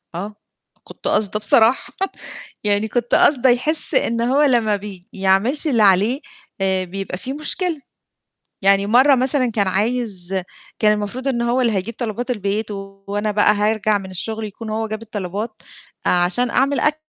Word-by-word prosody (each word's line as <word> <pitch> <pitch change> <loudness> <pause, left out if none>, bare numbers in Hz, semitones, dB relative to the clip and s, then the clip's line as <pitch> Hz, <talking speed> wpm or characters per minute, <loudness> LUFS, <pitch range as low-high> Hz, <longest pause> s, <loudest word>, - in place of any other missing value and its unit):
آه، 205 +5 -5 0.5
كنت - - -9
قاصده 210 0 +1
بصراحة، 225 +3 +3 0.7
يعني 205 +1 +1
كنت 240 +1 0
قاصده 265 -3 +4
يحس 275 +6 +1
إن 230 0 +1
هو 260 +5 +2
لمّا 235 -7 +3
بي 195 -3 -9
يعملش 195 - +2
اللي 235 -7 +3
عليه، 205 +8 +3 0.4
آآ، 190 -1 +2
بيبقى 190 0 -5
في 260 +7 -6
مشكلة، 310 +2 -3 0.8
يعني 195 0 +4
مَرّة 255 +6 +5
مثلًا 255 0 +2
كان 205 -3 +1
عايز 195 -3 -1 0.4
كان 210 -1 +4
المفروض 210 +6 -3
إن 240 -3 0
هو 240 +2 +1
اللي 235 -3 +2
هيجيب 205 +3 -2
طلبات 240 +1 -3
البيت، 210 -1 -2
وأنا 200 +1 -4
بقى 210 0 +4
هارجع 210 0 +1
من 190 -1 -9
الشغل 220 +4 -5
يكون 215 +2 -8
هو 220 +1 -2
جاب 215 +1 -5
الطلبات، 210 +1 -5 0.4
عشان 180 +8 +2
أعمل 275 +2 +2
أكل 300 +1 +1
215 Hz, 155 wpm, -20 LUFS, 200-245 Hz, 0.8 s, مَرّة